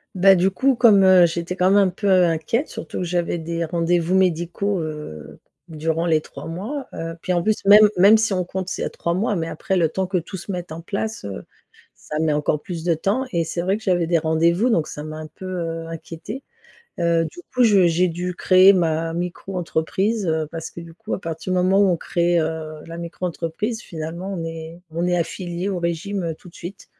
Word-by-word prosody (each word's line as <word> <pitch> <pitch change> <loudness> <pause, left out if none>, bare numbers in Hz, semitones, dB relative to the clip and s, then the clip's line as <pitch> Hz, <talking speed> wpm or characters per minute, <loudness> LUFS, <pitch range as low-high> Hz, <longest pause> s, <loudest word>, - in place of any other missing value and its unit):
Bah, 195 +1 +7
du 185 +1 +3
coup, 265 +6 +2
comme, 220 -5 +6
heu, 185 -2 +7
j'étais, 170 +2 -4
quand 185 0 +3
même, 200 - +5
un 195 -2 +5
peu 200 +3 -2 0.2
inquiète, 170 - 0
surtout - - -7
que, - - -1
j'avais 175 0 -1
des 165 +1 -3
rendez-vous 170 +2 +1
médicaux, 180 +1 +1
heu, 150 - -7 0.3
durant 165 +1 -2
les 160 -2 +3
3 - - -10
mois, 225 - -5
heu. 165 0 -5
Puis, 185 - -2
en 175 -1 +1
plus, 215 0 0
même 210 +1 +9
même 200 +4 +7
si 220 -2 +1
on 180 -1 0
compte, 185 +1 -5
c'est - - -3
à - - -1
3 170 - -2
mois, 205 +3 0
mais 165 -1 -2
après 190 +4 -2
le 165 -2 +3
temps 185 +4 -2
que 185 -1 0
tout 175 +3 -5
se 195 - -7
mette 180 -2 -5
en 165 +1 -6
place, 205 - -4
heu, 95 -11 -6 0.5
ça 150 - -6
met 155 -2 +2
encore 150 0 0
plus 170 -3 -6
de 170 -2 +2
temps 205 +11 0
et 170 -1 +2
c'est 170 +2 -3
vrai 190 +3 0
que 220 - -13
j'avais 175 -4 +1
des 170 -1 +3
rendez-vous 170 +8 +2
donc 160 -7 +1
ça 150 - -7
m'a 155 0 -7
un 155 0 -7
peu, 190 - -12
heu, 165 -3 -4
inquiétée. 165 - -7 0.6
Heu, 170 -1 +2
du 350 - -11
coup, 250 -1 +4
je 200 -5 +5
j'ai 175 +2 +2
dû 180 +2 -4
créer 185 +2 +6
ma 165 -2 0
micro-entreprise, 180 +3 -2
heu, 160 -1 0
parce 165 -1 -6
que, 170 - -9
du 165 -1 -11
coup, 220 +4 -8
à - - -5
partir 165 +2 -4
du - - +1
moment 185 +2 +3
où 200 - +5
on 175 - +2
crée, 175 0 +1
heu, 155 -1 -4
la 165 0 -8
micro-entreprise, 175 +5 -4
finalement, 170 +4 -6
on 165 - -4
est 165 +1 -7
on 170 +2 -1
est 175 0 +1
affilié 175 +2 -3
au 185 - -2
régime, 170 +3 -2
heu, 165 -1 -2
tout 180 - -16
de - - -26
suite, 180 +4 -9
175 Hz, 225 wpm, -22 LUFS, 165-190 Hz, 0.6 s, même